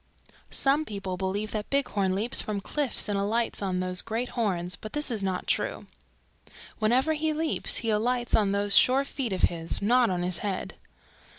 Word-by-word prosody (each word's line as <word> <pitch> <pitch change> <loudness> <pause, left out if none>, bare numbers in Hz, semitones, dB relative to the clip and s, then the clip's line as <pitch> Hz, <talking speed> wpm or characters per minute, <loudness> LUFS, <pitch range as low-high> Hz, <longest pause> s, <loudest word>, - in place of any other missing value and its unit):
"Some 280 +3 +2
people 195 -7 -5
believe 195 +3 -3
that 210 -1 -4
Bighorn 205 -9 0
leaps 220 +5 +2
from 210 -2 -3
cliffs 275 +6 0
and 205 -1 -1
alights 225 +4 0
on 185 -2 -1
those 185 0 +1
great 230 +3 -3
horns, 180 -7 -2
but 215 - -10
this 295 -3 0
not 190 -2 -2
true. - - -1 0.9
Whenever 250 +8 +2
he 310 0 -1
leaps 315 +1 +1
he 230 -2 0
alights 240 +3 0
on 205 -3 +2
those 200 0 +2
sure 265 +2 +5
feet 270 -4 -4
of 185 - -3
his, 165 -1 0
not 240 +3 +3
on 180 -1 -1
his 180 -1 +2
head. 200 -3 -3
215 Hz, 175 wpm, -27 LUFS, 190-250 Hz, 0.9 s, sure